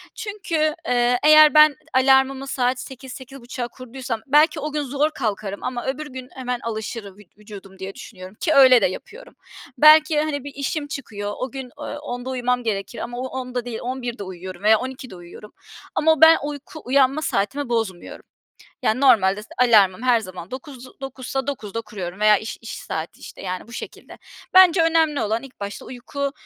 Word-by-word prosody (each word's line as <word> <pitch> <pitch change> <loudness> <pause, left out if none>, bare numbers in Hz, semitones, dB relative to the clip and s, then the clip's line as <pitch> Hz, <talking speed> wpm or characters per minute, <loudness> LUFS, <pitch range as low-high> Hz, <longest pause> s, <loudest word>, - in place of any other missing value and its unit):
Çünkü, 335 -8 -2
eee, 245 0 +2
eğer 305 0 +8
ben 305 -1 +7 0.2
alarmımı 265 +1 +3
saat 255 -1 0
8.00-8.30'a 260 -1 -8
kurduysam 255 -2 -6
belki 300 +3 +4
o 300 +1 -4
gün 300 0 -1
zor 285 +3 0
kalkarım 210 -7 -4
ama 245 -1 -4
öbür 280 +3 -3
gün 260 -2 -9
hemen 250 -2 -3
alışırım, 220 -3 -6
vü 210 - -15
vücudum 200 -2 -13
diye 190 +1 -7
düşünüyorum 185 -2 -11
ki 315 - +1
öyle 260 -4 +7
de - - +3
yapıyorum. 440 - -7 0.4
Belki, 305 0 +6
hani, 295 -3 -3
bir 285 0 -8
işim 290 +2 -3
çıkıyor. 205 -8 -6
O 255 -1 -4
gün, 265 -2 -7
ooo, 295 - -7 0.2
10'da 245 -3 -6
uyumam 250 -1 -1
gerekir 205 0 -3
ama 240 +1 -6
o 255 +1 -3
onda 250 -2 -5
değil, 235 -2 -5
23.00'te 245 -3 -4
uyuyorum 185 0 -9
veya 215 0 +5
00.00'da 255 -4 -7
uyuyorum 175 +4 -13 0.4
ama 320 +1 +4
o 315 - -5
ben 320 0 +9
uyku 295 +2 -7
uyanma 270 +3 +3
saatimi 260 +2 -1
bozmuyorum. 225 -7 -3 0.6
Yani, 220 +4 +1
normalde 210 -7 +4
s - - -16
alarmım 215 -5 +4
her 245 -2 +3
zaman 185 -3 -9
9.00, 260 -1 -10
9.00'sa 270 0 -5
9.00'da 230 -6 -4
kuruyorum 195 -4 -7
veya 210 0 +6
iş 220 - -7
iş 230 - -9
saati, 160 +1 -6
işte, - - -11
yani, 185 0 -5
bu - - -13
şekilde. - - -9 0.4
Bence 370 -2 +7
önemli 320 -3 +2
olan 220 +2 -1
ilk 270 -5 -14
başta 200 0 -6
uyku 275 +3 -5
250 Hz, 175 wpm, -22 LUFS, 215-280 Hz, 0.6 s, ben